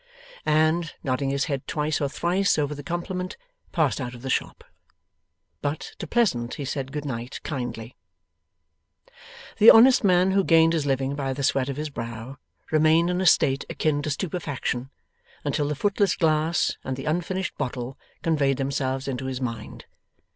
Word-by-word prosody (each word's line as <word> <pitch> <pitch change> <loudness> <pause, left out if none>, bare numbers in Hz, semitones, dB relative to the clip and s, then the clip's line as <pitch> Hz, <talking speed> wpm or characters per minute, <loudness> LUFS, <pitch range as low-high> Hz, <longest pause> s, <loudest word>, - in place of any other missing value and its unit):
and, 155 +2 +2
nodding 135 +1 0
his 135 0 0
head 140 -4 -3
twice 150 -1 -1
or 140 - 0
thrice 180 +6 +1
over 150 -1 0
the 145 - -7
compliment, 180 +4 -4 0.3
passed 145 - +1
out 125 -1 -5
of 120 - -12
the 135 - -2
shop. - - -2 1.0
But, 145 +2 -3
to - - -5
Pleasant 125 - +1
he 140 - -5
said 135 0 -4
good 150 0 -4
night 120 -2 -5
kindly. 120 -4 -5 1.6
The 220 - +9
honest 245 +3 +8
man 185 -1 +4
who 195 0 +3
gained 165 -1 +5
his 155 -3 0
living 135 0 0
by 135 -2 -2
the 140 +1 -4
sweat 135 0 +1
of 140 - -4
his 150 0 -4
brow 115 +2 -7 0.3
remained 160 +3 +4
in 180 +1 0
a 190 - +2
state 135 -3 +4
akin 150 -2 0
to 150 - -3
stupefaction, 145 -5 -3 0.5
until 145 0 0
the 150 - -1
footless 200 +4 +1
glass 160 0 +1
and 130 -1 -3
the 135 - -6
unfinished 175 +3 -2
bottle 125 0 -3 0.3
conveyed 140 -5 +2
themselves 135 -1 -2
into 130 -1 -3
his 130 -1 -3
mind. 115 -4 -5
145 Hz, 165 wpm, -25 LUFS, 130-165 Hz, 1.6 s, The